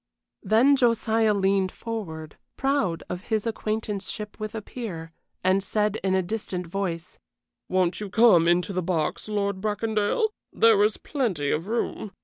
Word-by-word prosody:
Then 245 +6 +4
Josiah 225 -4 +2
leaned 195 -1 +2
forward, 160 -10 -6 0.2
proud 270 -12 0
of 180 +2 -6
his 220 -2 -1
acquaintanceship 215 -2 -3
with 215 +1 -5
a 220 - -3
peer, 175 -11 -7 0.3
and 185 +1 +3
said 210 +2 0
in 190 -1 +2
a 190 - +2
distinct 180 -2 -4
voice: 180 -3 -4 0.5
"Won't 185 +1 +1
you 205 - -4
come 190 -5 +5
into 175 +3 +2
the 185 - 0
box, 170 0 -1
Lord 200 -2 -1
Bracondale? 215 - 0 0.2
There 225 -3 +5
is 210 0 +2
plenty 195 - -1
of 160 +5 -1
room." 220 -2 -2
205 Hz, 145 wpm, -25 LUFS, 185-220 Hz, 0.5 s, come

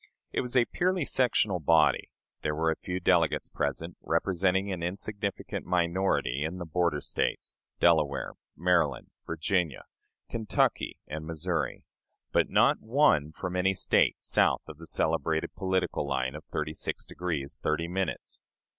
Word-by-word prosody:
It - - 0
was 125 +1 -1
a 120 - +5
purely 180 +1 0
sectional 110 -9 +2
body. 80 0 +3 0.3
There 75 -1 -1
were 80 +1 +2
a - - -1
few 90 +2 -4
delegates 90 - +2
present, 80 +4 -3
representing 95 +3 +1
an 90 -2 -3
insignificant 100 +3 -3
minority 85 -6 +1
in 80 +4 -3
the 90 - -5
"border 85 -2 0
States," - - -2 0.2
Delaware, 75 -5 +3 0.2
Maryland, 85 -6 +1 0.2
Virginia, 85 -2 -1 0.4
Kentucky, 110 -3 0
and 80 +1 -6
Missouri; 85 +2 -2 0.5
but - - +2
not - - +4
one 110 - +3
from 90 +3 -5
any 95 +1 +2
State - - +3
south - - +3
of 75 - -10
the 80 - -9
celebrated 80 +2 0
political 95 -6 -1
line 65 -1 -1
of 75 +1 -9
thirty 75 +2 -3
six - - -4
degrees 80 -6 -4
thirty 80 +2 0
minutes. 95 0 -3
85 Hz, 140 wpm, -29 LUFS, 80-95 Hz, 0.5 s, a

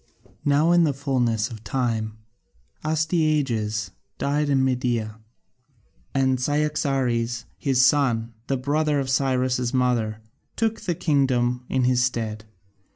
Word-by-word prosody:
Now 145 +4 +3
in 175 0 +5
the 145 -4 +1
fullness 125 -5 0
of 110 -1 -9
time 115 -4 -2 0.7
Astyages 150 - 0 0.3
died 145 +1 0
in 135 -2 +3
Media, 120 -4 -1 1.0
and 130 -1 +2
Cyaxares 130 -5 0
his 130 -2 +3
son, 120 -5 +2
the 135 - 0
brother 145 +3 +1
of 130 -1 -2
Cyrus' 130 -2 +1
mother, 120 -4 +1 0.4
took 225 0 -1
the 175 - -2
kingdom 125 -5 +1
in 130 -1 +1
his 125 0 +3
stead. 110 -3 -2
130 Hz, 115 wpm, -24 LUFS, 120-145 Hz, 1.0 s, in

